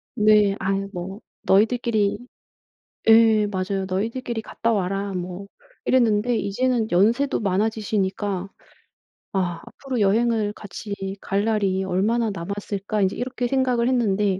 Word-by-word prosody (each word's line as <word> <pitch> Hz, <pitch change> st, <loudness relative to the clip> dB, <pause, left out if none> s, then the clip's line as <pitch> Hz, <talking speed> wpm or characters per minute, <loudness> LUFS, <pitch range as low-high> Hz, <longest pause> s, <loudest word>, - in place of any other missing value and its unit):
네 210 Hz, -2 st, +4 dB
"아유 195 Hz, +1 st, -1 dB
뭐 190 Hz, +4 st, -6 dB, 0.2 s
너희들끼리" 215 Hz, 0 st, +2 dB, 0.9 s
예 220 Hz, -2 st, +6 dB
맞아요. 195 Hz, 0 st, -2 dB
"너희들끼리 225 Hz, +4 st, -2 dB
갔다 230 Hz, +1 st, -1 dB
와라." 195 Hz, 0 st, -1 dB
뭐 180 Hz, +2 st, -5 dB, 0.4 s
이랬는데 235 Hz, -1 st, +3 dB
이제는 225 Hz, +2 st, 0 dB
연세도 230 Hz, +11 st, +2 dB
많아지시니까 200 Hz, -1 st, -1 dB, 0.9 s
'아 180 Hz, -3 st, -1 dB
앞으로 265 Hz, -3 st, -5 dB
여행을 215 Hz, +1 st, +2 dB
같이 205 Hz, 0 st, -8 dB, 0.3 s
갈 200 Hz, +2 st, -1 dB
날이 200 Hz, -4 st, +1 dB
얼마나 210 Hz, +5 st, +1 dB
남았을까.' 200 Hz, +3 st, -3 dB
인제 190 Hz, -, +1 dB
이렇게 245 Hz, 0 st, -2 dB
생각을 250 Hz, -2 st, +1 dB
했는데 205 Hz, -6 st, +1 dB
205 Hz, 290 characters per minute, -23 LUFS, 195-230 Hz, 0.9 s, 예